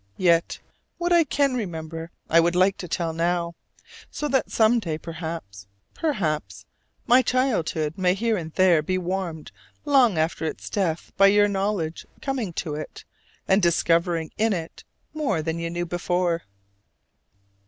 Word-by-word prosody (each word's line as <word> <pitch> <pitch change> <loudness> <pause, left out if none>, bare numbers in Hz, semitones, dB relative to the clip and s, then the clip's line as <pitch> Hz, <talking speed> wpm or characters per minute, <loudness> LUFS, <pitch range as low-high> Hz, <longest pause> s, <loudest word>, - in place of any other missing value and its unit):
Yet 170 -2 +2 0.4
what 350 0 +1
I 340 -1 +6
can 275 0 +1
remember 165 -7 -5 0.2
I 165 - +5
would 170 +1 +2
like 185 +2 +4
to 180 - -5
tell 165 0 -2
now: 170 +1 0 0.6
so 295 - -3
that 265 -1 +1
some 230 +1 +3
day, 165 -7 -3
perhaps, 160 - -7 0.3
perhaps, 190 - -2 0.4
my 250 +1 +6
childhood 195 - 0
may 180 0 +3
here 225 +2 0
and 165 -5 -5
there 180 -4 +4
be 185 +4 -1
warmed 180 -3 -4 0.3
long 260 - +4
after 160 +1 0
its 160 - -4
death 175 -5 -1
by 195 - +7
your 205 +1 +5
knowledge 195 -5 -2
coming 260 - -2
to 160 -2 -3
it 150 +1 -7 0.4
and 190 +2 +4
discovering 170 -1 +2
in 220 0 +3
it 165 -3 -6 0.3
more 240 - -1
than 165 +1 -2
you 170 0 -3
knew 175 +1 -3
before. 175 0 -1
175 Hz, 150 wpm, -24 LUFS, 165-210 Hz, 0.6 s, by